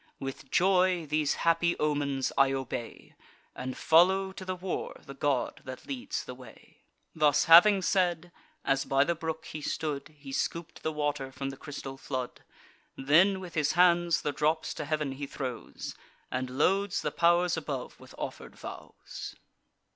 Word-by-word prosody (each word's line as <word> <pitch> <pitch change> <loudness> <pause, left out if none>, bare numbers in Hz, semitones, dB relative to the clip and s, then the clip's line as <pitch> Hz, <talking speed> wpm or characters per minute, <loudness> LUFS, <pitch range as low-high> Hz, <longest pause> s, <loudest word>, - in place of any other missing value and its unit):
With 135 -1 -7
joy, 185 -2 +3
these 150 -1 +1
happy 170 +1 +3
omens 145 -3 0
I 135 -1 +4
obey, 130 -3 -5 0.4
And 130 0 -5
follow 190 +4 +4
to 190 - -9
the 185 0 -3
war 180 0 -4
the 140 - -8
god 135 -2 -1
that 130 -1 -8
leads 260 -3 -4
the 125 - -7
way." 125 -3 -16 0.3
Thus 150 -2 +3
having 185 +4 +8
said, 175 -2 +1 0.3
as 135 0 +2
by 135 0 +3
the 170 - +1
brook 160 -1 -5
he 155 - -7
stood, 150 0 -3
He 140 -1 -10
scoop'd 165 +4 -3
the 155 - -1
water 145 -3 -2
from 135 0 -4
the - - -9
crystal 135 -2 -7
flood; 130 -3 -4 0.6
Then 170 +8 +4
with 180 -3 -9
his 150 -2 +1
hands 175 -1 +4
the 145 - 0
drops 155 +2 0
to 150 - -5
heav'n 150 -2 -1
he 140 +1 -5
throws, 130 -4 -6 0.4
And 130 0 -2
loads 190 +9 +1
the - - -1
pow'rs 175 +1 +3
above 145 -5 -5
with - - -14
offer'd - - -6
vows. - - -9
150 Hz, 160 wpm, -29 LUFS, 135-175 Hz, 0.6 s, having